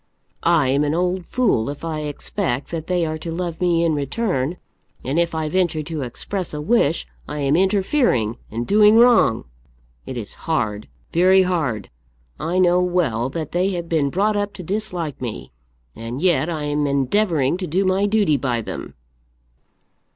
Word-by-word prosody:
I 165 -6 +3
am 140 +2 +2
an 150 +1 0
old 180 0 -1
fool 205 - +1
if 145 +3 -6
I 160 -2 -3
expect 150 -1 -3
that 160 -2 -4
they 180 -2 +1
are 155 0 -3
to 165 - -5
love 170 0 -4
me 170 -2 +2
in 165 - +2
return, 150 - -1 0.5
and 140 +6 0
if 170 -1 0
I 160 -1 -1
venture 170 -2 0
to 155 -1 -5
express 160 +8 -4
a - - -4
wish 165 -1 +1 0.2
I 150 0 -4
am 140 +1 +2
interfering 190 - +2
and 115 +2 -3
doing 210 - +5
wrong! 230 - +5 0.6
It 130 - -5
is 110 -4 -6 0.2
hard, 110 -9 -1 0.3
very 185 +3 +5
hard. 150 - -2 0.5
I 175 +3 -1
know 180 -1 +4
well 160 -10 0
that 155 +1 -5
they 180 +2 +1
have 170 -1 -4
been 155 -4 +1
brought 205 +7 +1
up 205 0 -1
to 185 - -8
dislike 180 - -4
me, 105 - -5 0.4
and 115 +3 -6
yet 175 -2 +2
I 155 -3 -3
am 145 0 0
endeavouring 140 +2 +1
to 185 -1 -4
do 185 +6 +1
my 190 +2 +2
duty 205 -8 +2
by 125 -3 -1
them." - - -7
165 Hz, 175 wpm, -21 LUFS, 140-185 Hz, 0.6 s, doing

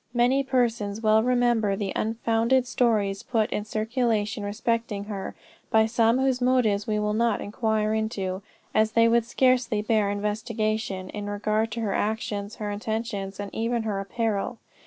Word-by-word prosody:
Many 245 +3 +3
persons 235 -5 0
well 215 0 +4
remember 240 -4 +2
the 195 -1 -3
unfounded 230 +3 +1
stories 215 -5 +1
put 225 -2 0
in 210 - -2
circulation 220 0 -1
respecting 210 0 -2
her, 200 -2 -6 0.3
by 220 0 +4
some 230 +1 +3
whose 260 -1 +1
motives 240 -5 +2
we 215 -1 0
will 210 0 0
not 230 0 +1
inquire 215 0 0
into, 200 -4 -2 0.3
as 220 0 +2
they 230 0 +5
would 230 0 +3
scarcely 245 -4 +2
bear 215 -2 +2
investigation, 210 -1 -2
in 205 -1 -5
regard 215 +2 0
to 230 - -3
her 205 -3 -1
actions, 210 -1 -2
her 210 -1 -4
intentions, 205 -2 -4
and 200 -1 -5
even 230 +1 -1
her 210 -3 -2
apparel. 210 +2 -2
220 Hz, 155 wpm, -26 LUFS, 205-235 Hz, 0.3 s, they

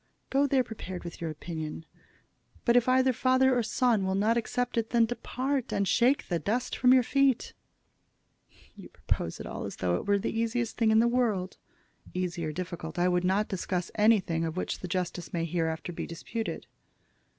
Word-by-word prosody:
Go 275 +1 +3
there 265 -2 +3
prepared 190 -6 -7
with 170 -1 -8
your 165 - -2
opinion. 160 0 -6 0.8
But 235 - +4
if 245 0 +4
either 260 0 +4
father 260 +1 +3
or 245 - +2
son 230 -2 +1
will 190 0 0
not 215 +4 +2
accept 245 +1 -1
it, 230 -1 0
then 235 -1 +4
depart, 255 +3 -2
and 200 -1 0
shake 245 +9 +3
the 170 -2 0
dust 220 +10 -1
from 250 - +4
your 255 -1 +6
feet." 275 0 +2 1.2
"You - - -12
propose 80 - -3
it - - -6
all - - -5
as - - -5
though 90 -1 0
it - - -7
were 200 0 +4
the 200 - -3
easiest 230 +1 -1
thing 225 -2 +2
in 220 0 +5
the 235 - +3
world." 220 -7 0 0.6
"Easy 180 -2 -2
or 155 - -2
difficult. 170 -1 -6
I 175 +1 +3
would 180 0 +1
not 195 +3 +2
discuss 180 -1 -3
anything 210 -7 +3
of 165 +1 -3
which - - -2
the 180 - -6
justice 175 -3 -3
may 165 -1 0
hereafter 165 0 -2
be - - -5
disputed." 220 +7 -5
205 Hz, 190 wpm, -29 LUFS, 175-245 Hz, 1.2 s, your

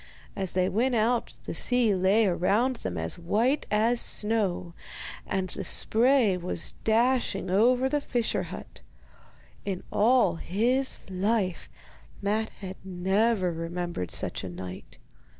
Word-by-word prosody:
As 190 -2 -1
they 185 0 +2
went 240 +6 0
out 230 +2 0
the - - -4
sea 245 -4 +2
lay 195 +4 +3
around 205 +8 +1
them - - -5
as - - -2
white 225 - 0
as 225 +2 +4
now, 195 -5 -1 0.5
and 190 -2 -2
the - - -6
spray 235 -3 +3
was 175 -1 -2
dashing 230 -3 +1
right 185 0 -1
over 250 +5 +3
the 290 +2 -1
fisher 240 -4 -1
hut. - - -10 0.8
In 190 -3 -4
all 215 -5 +3
his 245 +10 +1
life 190 0 -1 0.5
Matte 215 +2 -1
had 190 -1 -7
never 190 +2 0
remembered 165 - -4
such - - -1
a 95 - -5
night. 90 +1 -9
205 Hz, 135 wpm, -27 LUFS, 185-235 Hz, 0.8 s, as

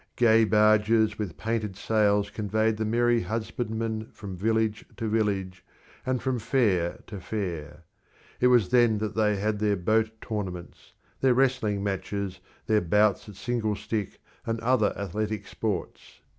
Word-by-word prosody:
Gay 115 -2 +5
barges 110 0 +3
with 100 -6 -4
painted 110 -3 -2
sails 105 -1 +1
conveyed 110 +1 0
the 110 - -1
merry 120 +1 +2
husbandmen 110 +1 -3
from 100 -3 -8
village 110 +2 0
to 115 - -3
village 100 -4 -1 0.4
and 130 -1 0
from 130 -2 0
fair 100 -9 +1
to 100 -3 -8
fair. 85 -6 -5 0.6
It 125 - +4
was 120 -6 +4
then 120 -3 +4
that 105 0 -3
they 105 -1 +2
had 105 +1 -1
their 105 -1 +1
boat 110 +5 +2
tournaments, 95 -6 -6 0.3
their 130 -2 +3
wrestling 125 -6 +1
matches, 100 -1 -3 0.3
their 105 -1 +3
bouts 105 +3 +2
at 105 - -11
single 110 +2 -1
stick 105 -1 -4 0.2
and 115 0 -2
other 115 -3 +2
athletic 105 +1 -3
sports. 100 -4 -5
110 Hz, 145 wpm, -27 LUFS, 100-115 Hz, 0.6 s, Gay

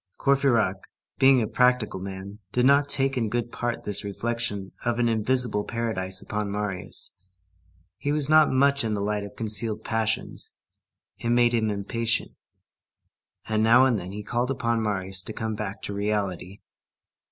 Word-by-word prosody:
Courfeyrac, 130 -8 +2 0.4
being 135 -2 +6
a - - -2
practical 125 -6 +2
man, 95 +2 -7
did 125 0 +2
not 140 +1 +4
take 135 -1 +2
in 115 -3 0
good 120 +1 -2
part 120 -1 -3
this 105 - 0
reflection 105 -1 -3
of 120 -1 0
an 120 -1 +2
invisible 115 -1 +1
paradise 110 -6 -3
upon 105 -1 -3
Marius; 100 -2 -3 0.9
he 145 - -1
was 150 -2 +1
not 155 0 +6
much 140 +1 +3
in 110 -2 -1
the 100 0 -2
habit 105 -1 -1
of 100 - -11
concealed 110 0 -1
passions; 110 0 -2 0.6
it 115 - -2
made 120 0 +4
him 110 -2 +1
impatient, 115 +3 -1 1.2
and 110 -1 +1
now 120 +4 +6
and 120 -5 +2
then 90 +1 -7
he 105 +1 -6
called 120 +4 -1
upon 115 -3 0
Marius 95 -3 -1
to 110 - -7
come 110 0 -3
back 105 -1 -5
to 100 - -3
reality. 100 -2 -2
110 Hz, 160 wpm, -26 LUFS, 105-120 Hz, 1.2 s, being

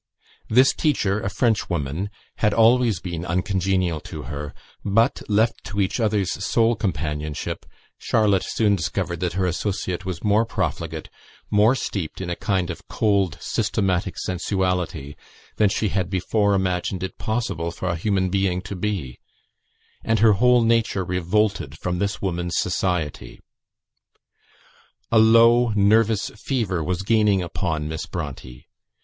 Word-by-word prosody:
This 130 +4 +5
teacher, 110 -9 0
a 100 - -2
Frenchwoman, 95 - -1 0.3
had 105 -1 +1
always 115 -3 +4
been 85 -2 -5
uncongenial 90 -1 0
to - - -8
her; 75 +2 -6 0.3
but, 115 +6 +2
left 110 +3 +1
to 105 -2 -4
each 95 +4 0
other's 105 -4 +1
sole 115 0 +2
companionship, 75 -7 -3 0.3
Charlotte 105 -5 +2
soon 105 -3 +1
discovered 80 0 -2
that 90 -1 -1
her 95 +1 0
associate 95 0 -2
was 90 -3 -5
more 105 +1 +3
profligate, 80 -7 -3 0.4
more 105 +5 +4
steeped 95 -10 -4
in 90 -2 -4
a - - -1
kind 95 -2 -1
of 85 - -10
cold, 100 -6 +1
systematic 95 -1 -1
sensuality, 90 -5 -2 0.4
than 105 -2 +4
she 105 +1 0
had 95 -2 -1
before 100 +2 +1
imagined 95 0 -1
it 95 - -6
possible 105 -7 -2
for 90 +2 -5
a 85 - 0
human 95 +1 0
being 95 -2 +1
to 100 0 -6
be; 90 - -3 0.8
and 115 0 +1
her 110 0 +5
whole 125 +4 +4
nature 115 -4 +1
revolted 90 -4 0
from 90 +1 -3
this 100 +1 -1
woman's 90 -2 -2
society. 80 -9 -2 1.7
A 115 - +5
low 115 +2 +6
nervous 110 +1 +3
fever 100 - -1
was 90 +3 -2
gaining 105 -3 +3
upon 80 -3 -2
Miss 80 0 -5
Bronte. 70 -7 -7
95 Hz, 135 wpm, -23 LUFS, 85-110 Hz, 1.7 s, low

